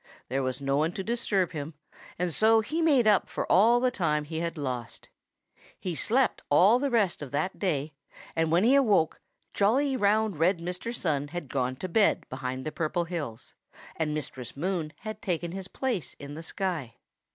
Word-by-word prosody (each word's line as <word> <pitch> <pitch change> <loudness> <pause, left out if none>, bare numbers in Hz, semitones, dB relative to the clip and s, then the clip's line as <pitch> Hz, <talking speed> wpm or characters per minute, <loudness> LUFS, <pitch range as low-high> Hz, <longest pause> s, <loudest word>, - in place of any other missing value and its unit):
There 135 +2 0
was 130 0 -2
no 135 0 0
one 160 +3 +1
to 195 - -4
disturb 210 -5 0
him, 150 -1 -6 0.4
and 175 -1 -1
so 220 +4 +5
he 315 +10 -2
made 285 -7 +4
up 210 -2 +4
for - - -3
all 230 +6 +6
the 250 0 +2
time 155 -8 0
he 160 +2 -5
had 170 0 -3
lost. 125 -5 -5 0.7
He 180 - -3
slept 245 - +1
all 195 +11 +6
the 280 +1 0
rest 205 -10 +1
of 145 - -6
that 180 +8 -2
day, 155 -6 -1 0.4
and 160 -1 +1
when 175 +3 +4
he 245 +4 +5
awoke, 210 - +3 0.3
jolly, 265 +7 +2
round 210 - +2
red 175 +3 +3
Mr. 180 +6 -4
Sun 150 -11 -1
had 160 -2 -6
gone 130 -1 -1
to 185 - -5
bed 205 +4 +2
behind 130 0 -4
the 155 - -2
Purple 165 +2 -1
Hills, 155 -10 -6 0.4
and 160 -2 -1
Mistress 135 -4 -5
Moon 170 -1 -2
had 215 -1 -6
taken 175 -5 -2
his 190 0 -6
place 240 - -3
in 145 0 -9
the 160 - -7
sky. 165 -9 -3
175 Hz, 185 wpm, -28 LUFS, 150-215 Hz, 0.7 s, all